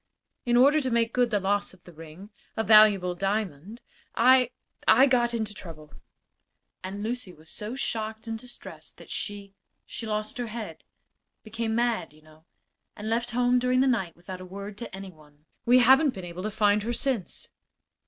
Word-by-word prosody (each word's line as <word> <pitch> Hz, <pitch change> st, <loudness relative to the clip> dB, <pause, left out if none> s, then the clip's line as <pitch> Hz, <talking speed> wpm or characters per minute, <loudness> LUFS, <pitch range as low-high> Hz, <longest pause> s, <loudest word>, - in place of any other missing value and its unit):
In 240 Hz, 0 st, +3 dB
order 285 Hz, +5 st, +5 dB
to 260 Hz, -, -1 dB
make 230 Hz, -1 st, +1 dB
good 245 Hz, -1 st, +2 dB
the 210 Hz, -3 st, +1 dB
loss 200 Hz, 0 st, -1 dB
of 180 Hz, -, -27 dB
the 175 Hz, -, -14 dB
ring, 165 Hz, +6 st, -12 dB, 0.3 s
a 220 Hz, -, +1 dB
valuable 210 Hz, -5 st, +6 dB
diamond 195 Hz, -, -3 dB, 0.3 s
I 255 Hz, +1 st, +5 dB, 0.4 s
I 265 Hz, -, +7 dB
got 245 Hz, -3 st, +2 dB
into 220 Hz, -3 st, -3 dB
trouble, 155 Hz, -6 st, -12 dB, 0.9 s
and 195 Hz, +2 st, -5 dB
Lucy 230 Hz, -3 st, -4 dB
was 160 Hz, -1 st, -15 dB
so 215 Hz, +4 st, -6 dB
shocked 220 Hz, -3 st, -4 dB
and 225 Hz, -1 st, -4 dB
distressed 250 Hz, +1 st, -11 dB
that -, -, -13 dB
she 200 Hz, -1 st, -6 dB, 0.3 s
she 230 Hz, -, -7 dB
lost 215 Hz, +2 st, -2 dB
her 240 Hz, -, -2 dB
head 225 Hz, 0 st, -7 dB, 0.6 s
became 225 Hz, 0 st, -3 dB
mad, 235 Hz, -10 st, 0 dB
you 155 Hz, 0 st, -21 dB
know 155 Hz, +1 st, -20 dB, 0.5 s
and 215 Hz, +1 st, -5 dB
left 235 Hz, +1 st, 0 dB
home 245 Hz, +1 st, +2 dB
during 250 Hz, +1 st, +2 dB
the -, -, +4 dB
night 220 Hz, -10 st, 0 dB
without 180 Hz, +2 st, -9 dB
a -, -, -7 dB
word 200 Hz, +2 st, -8 dB
to 235 Hz, -, -7 dB
any 195 Hz, 0 st, -8 dB
one. 150 Hz, -2 st, -22 dB, 0.2 s
We 245 Hz, +1 st, +7 dB
haven't 265 Hz, +3 st, +5 dB
been 190 Hz, -2 st, -7 dB
able 175 Hz, +1 st, -7 dB
to 215 Hz, -, -2 dB
find 210 Hz, 0 st, +2 dB
her 235 Hz, +3 st, -2 dB
since." 240 Hz, -, -2 dB
215 Hz, 185 wpm, -27 LUFS, 185-240 Hz, 0.9 s, I